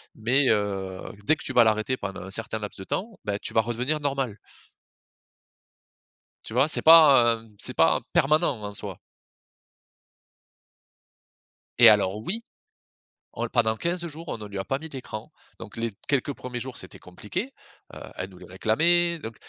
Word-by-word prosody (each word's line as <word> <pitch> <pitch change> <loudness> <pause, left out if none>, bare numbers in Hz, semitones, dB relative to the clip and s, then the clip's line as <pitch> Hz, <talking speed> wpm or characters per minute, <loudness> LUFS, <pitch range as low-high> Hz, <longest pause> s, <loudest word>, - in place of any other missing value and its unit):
Mais, 125 +5 +2
heu, 95 -3 -1 0.3
dès 155 - +5
que - - -11
tu 130 - -1
vas 120 - +7
l'arrêter 110 +3 +1
pendant 95 -7 -6
un 95 - -9
certain 110 +1 -2
laps 105 -2 -7
de 95 - -8
temps, 215 +2 -4
bah, 100 -1 -2
tu - - -6
vas 110 - +4
redevenir 125 +7 -2
normal. 135 -7 -2 2.1
Tu 110 - -7
vois, 130 +4 +3
c'est - - +4
pas, 140 -8 +7
heu, 115 0 -16
c'est - - -1
pas - - +3
permanent 150 -5 +2
en 105 0 -5
soi. - - -2 2.8
Et 120 - +10
alors 105 -1 +3
oui, 225 - -4 0.9
on 115 - -4
l 115 - -6
pendant 110 -2 +1
15 170 +3 -2
jours 165 +1 -8
on 115 - -4
ne 105 -1 -8
lui 100 -1 -6
a 95 - -4
pas 135 +1 -2
mis 160 - -8
d'écran. 130 -6 -7 0.3
Donc - - -10
les 115 -1 -2 0.2
quelques 140 0 0
1ers 125 -2 -7
jours 130 +1 -6
c'était 95 - -7
compliqué, 175 - -6 0.4
heu, - - -9 0.2
elle 95 +1 -5
nous 90 - -15
les - - -12
réclamait, 170 - +1
donc. 115 -5 -8
120 Hz, 170 wpm, -25 LUFS, 105-150 Hz, 2.8 s, Et